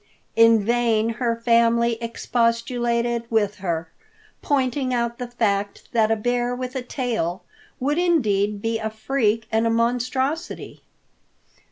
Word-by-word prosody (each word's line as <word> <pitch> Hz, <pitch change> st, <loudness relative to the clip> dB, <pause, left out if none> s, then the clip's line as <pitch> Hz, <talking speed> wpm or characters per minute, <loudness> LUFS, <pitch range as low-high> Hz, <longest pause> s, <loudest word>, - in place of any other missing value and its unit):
In 230 Hz, -2 st, +5 dB
vain 230 Hz, -1 st, +2 dB
her 230 Hz, 0 st, -1 dB
family 235 Hz, 0 st, +2 dB
expostulated 235 Hz, 0 st, 0 dB
with 210 Hz, -2 st, +1 dB
her, 170 Hz, -4 st, -3 dB, 0.5 s
pointing 260 Hz, -2 st, 0 dB
out 235 Hz, 0 st, -2 dB
the 250 Hz, -, -4 dB
fact 205 Hz, -4 st, -2 dB
that 220 Hz, -2 st, +3 dB
a 225 Hz, -, +3 dB
bear 245 Hz, +2 st, -1 dB
with 255 Hz, +1 st, -5 dB
a 260 Hz, -, -1 dB
tail 235 Hz, -, -2 dB, 0.4 s
would 290 Hz, +5 st, 0 dB
indeed 210 Hz, -, +1 dB
be 225 Hz, 0 st, 0 dB
a 220 Hz, 0 st, -2 dB
freak 220 Hz, -1 st, 0 dB
and 225 Hz, +1 st, +2 dB
a -, -, +2 dB
monstrosity. 250 Hz, +6 st, -1 dB
235 Hz, 130 wpm, -23 LUFS, 220-245 Hz, 0.5 s, In